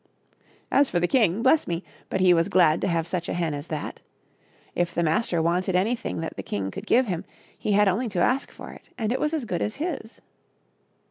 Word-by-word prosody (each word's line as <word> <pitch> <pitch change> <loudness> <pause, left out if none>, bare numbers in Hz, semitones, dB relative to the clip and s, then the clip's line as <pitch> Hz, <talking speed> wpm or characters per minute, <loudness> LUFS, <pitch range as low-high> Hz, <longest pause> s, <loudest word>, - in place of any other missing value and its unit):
As 280 -1 +4
for 175 - +1
the 175 - +2
king, 220 -4 +2
bless 280 +4 +4
me! 170 +1 -2 0.3
but 190 - -1
he 180 -1 +6
was 165 -1 +2
glad 170 -3 +4
to - - 0
have 165 -2 0
such 175 -2 -3
a - - -2
hen 170 -3 -1
as 145 +2 -6
that. 155 -2 -5 0.7
If 175 -1 -1
the 170 - +1
master 165 0 +1
wanted 180 +2 +1
anything 210 -1 0
that 165 - -5
the - - -5
king 95 -1 -3
could 200 - -8
give 255 +2 +4
him, 180 -6 -3 0.3
he 210 - -1
had 205 +1 +5
only 220 +6 +1
to 180 - -2
ask 255 +9 +2
for - - -10
it - - -15
and 225 -2 -1
it 255 - 0
was 300 - 0
as 310 -6 -2
good 180 -6 -2
as 210 - -2
his. 290 -7 -5
185 Hz, 225 wpm, -25 LUFS, 170-230 Hz, 0.7 s, he